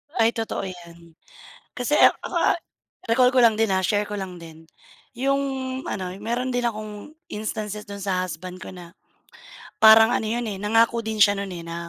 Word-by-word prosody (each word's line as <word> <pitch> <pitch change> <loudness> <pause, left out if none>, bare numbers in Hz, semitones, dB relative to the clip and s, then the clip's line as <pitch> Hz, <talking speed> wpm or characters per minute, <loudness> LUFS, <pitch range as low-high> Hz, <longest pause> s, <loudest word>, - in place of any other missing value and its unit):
Ay 230 -1 +3
totoo 225 -3 -4
'yan. 170 -2 -10 0.6
Kasi 250 +4 0
ak - - +5
ako, - - -6
ah, - - +2 0.5
recall 250 +2 +4
ko 255 - +4
lang 225 -2 +5
din 220 -3 +1
ha, 190 - +2
share 205 +3 +1
ko 205 0 -6
lang 190 -2 -6
din. 165 -1 -13 0.5
'Yong 275 +2 +1 0.5
ano, 185 -2 -4
meron 240 +4 -2
din 245 0 -1
akong 215 +6 -8 0.2
instances 210 0 -5
do'n 200 -1 -7
sa 185 -2 0
husband 180 +2 -8
ko - - -9
na, 175 -2 -11 0.9
parang 220 +1 +8
ano 220 - 0
'yon 240 +2 -2
eh 200 -3 -5
nangako 225 +3 +2
din 220 -1 -4
siya 205 0 +6
no'n, 200 0 -4
eh, 170 -1 -8
na 170 0 -6
210 Hz, 185 wpm, -23 LUFS, 185-230 Hz, 0.9 s, parang